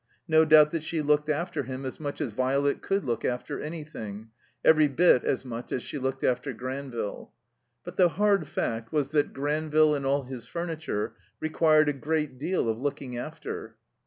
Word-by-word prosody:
No 160 Hz, -1 st, +5 dB
doubt 155 Hz, -1 st, +7 dB
that 165 Hz, -, -1 dB
she 160 Hz, +1 st, -3 dB
looked 150 Hz, +1 st, +2 dB
after 160 Hz, +1 st, -1 dB
him 130 Hz, 0 st, -6 dB
as 130 Hz, -, -5 dB
much 145 Hz, 0 st, -4 dB
as 130 Hz, -8 st, -2 dB
Violet 135 Hz, +4 st, +1 dB
could 195 Hz, +1 st, -1 dB
look 115 Hz, -3 st, -1 dB
after 125 Hz, 0 st, -2 dB
anything; 115 Hz, -9 st, -7 dB, 0.3 s
every 155 Hz, -1 st, +6 dB
bit 140 Hz, -2 st, +4 dB
as 135 Hz, -, -1 dB
much 120 Hz, -1 st, -6 dB
as 125 Hz, -, -2 dB
she 145 Hz, -, -5 dB
looked 130 Hz, 0 st, -2 dB
after 125 Hz, +2 st, 0 dB
Granville. 130 Hz, -3 st, -5 dB, 0.5 s
But -, -, -9 dB
the 180 Hz, -2 st, +6 dB
hard 200 Hz, +4 st, +2 dB
fact 115 Hz, 0 st, -3 dB
was 145 Hz, -3 st, 0 dB
that 145 Hz, -1 st, +1 dB
Granville 150 Hz, +2 st, +2 dB
and 140 Hz, -2 st, -2 dB
all 140 Hz, +1 st, +1 dB
his 125 Hz, -2 st, -8 dB
furniture 160 Hz, -10 st, -3 dB, 0.2 s
required 155 Hz, -1 st, +3 dB
a 145 Hz, -, +2 dB
great 150 Hz, -2 st, -2 dB
deal 175 Hz, -2 st, 0 dB
of 110 Hz, 0 st, -1 dB
looking 135 Hz, -2 st, -3 dB
after. 120 Hz, -, -6 dB
145 Hz, 180 wpm, -27 LUFS, 130-155 Hz, 0.5 s, doubt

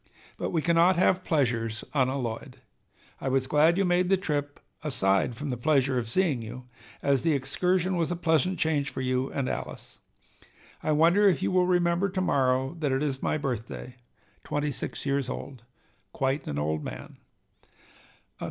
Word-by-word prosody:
But -, -, -3 dB
we 160 Hz, -3 st, -1 dB
cannot 170 Hz, +2 st, +4 dB
have 185 Hz, +1 st, +2 dB
pleasures 115 Hz, -7 st, 0 dB
unalloyed. 130 Hz, -4 st, -1 dB, 0.6 s
I -, -, -4 dB
was 130 Hz, 0 st, +1 dB
glad 150 Hz, +5 st, +4 dB
you 195 Hz, -, +2 dB
made 180 Hz, 0 st, +2 dB
the 195 Hz, -, +4 dB
trip, 145 Hz, -5 st, -3 dB, 0.2 s
aside 120 Hz, -, +1 dB
from 145 Hz, +2 st, -4 dB
the 125 Hz, -, -3 dB
pleasure 135 Hz, -1 st, +2 dB
of 115 Hz, -2 st, -5 dB
seeing 155 Hz, -4 st, +1 dB
you, 120 Hz, +3 st, -8 dB, 0.4 s
as 140 Hz, -2 st, +2 dB
the 165 Hz, -2 st, +2 dB
excursion 180 Hz, +7 st, 0 dB
was 170 Hz, -2 st, 0 dB
a 175 Hz, -, -1 dB
pleasant 175 Hz, +2 st, +1 dB
change 150 Hz, -4 st, +1 dB
for -, -, -5 dB
you 130 Hz, +1 st, -1 dB
and 135 Hz, -2 st, -2 dB
Alice. -, -, -6 dB, 0.8 s
"I 155 Hz, -, 0 dB
wonder 170 Hz, +7 st, +5 dB
if 180 Hz, -, 0 dB
you -, -, +1 dB
will 180 Hz, -1 st, +3 dB
remember 175 Hz, +1 st, +2 dB
to 185 Hz, 0 st, -2 dB
morrow 130 Hz, -3 st, +1 dB
that 145 Hz, -3 st, 0 dB
it 135 Hz, +2 st, +1 dB
is 135 Hz, -3 st, -2 dB
my -, -, 0 dB
birthday, 125 Hz, -2 st, -5 dB, 0.5 s
twenty 145 Hz, 0 st, -1 dB
six 135 Hz, -, -5 dB
years 140 Hz, -2 st, 0 dB
old. 130 Hz, -1 st, -6 dB, 0.5 s
Quite 135 Hz, +2 st, -1 dB
an 75 Hz, -, -3 dB
old 75 Hz, +1 st, -1 dB
man!" -, -, -8 dB
145 Hz, 170 wpm, -27 LUFS, 130-170 Hz, 0.8 s, wonder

